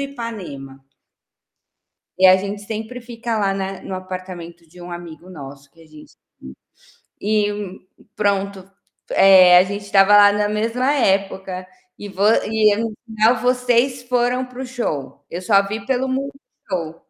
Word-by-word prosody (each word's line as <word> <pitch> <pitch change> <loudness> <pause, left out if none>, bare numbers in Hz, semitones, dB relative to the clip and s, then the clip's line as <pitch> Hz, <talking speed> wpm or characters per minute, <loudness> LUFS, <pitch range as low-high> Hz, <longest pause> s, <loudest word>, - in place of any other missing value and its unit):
Ipanema. 200 - -7 1.4
E 190 - +6
a 185 0 +7
gente 200 +2 -5
sempre 220 +4 -6
fica 235 -1 -4
lá 195 -1 0
na 195 0 -4
no 190 - -6
apartamento 185 -2 -8
de 175 +2 -14
um 175 - -9
amigo 175 0 -10
nosso 140 -3 -11
que 165 - -23
a 165 - -17
gente 155 -1 -16
tem. - - -65 0.9
E, 205 -2 -2 0.3
pronto, 200 -2 -2 0.4
eh, 185 -2 +7
a 180 - +5
gente 200 +2 -5
estava 200 0 +5
lá 205 0 +8
na 205 0 0
mesma 230 +6 0
época, 190 -5 -1 0.3
e 205 - -8
vo 195 0 -5 0.2
e 215 -1 +2
no 225 0 -3
final 225 +1 +2
vocês 250 +1 +1
foram 245 +1 0
para 250 0 -11
o - - -5
show? 145 - -5
Eu 175 +2 -5
só 200 0 +4
vi 205 0 -5
pelo 260 +1 -1
Multishow. 230 - -6
200 Hz, 150 wpm, -20 LUFS, 185-230 Hz, 1.4 s, lá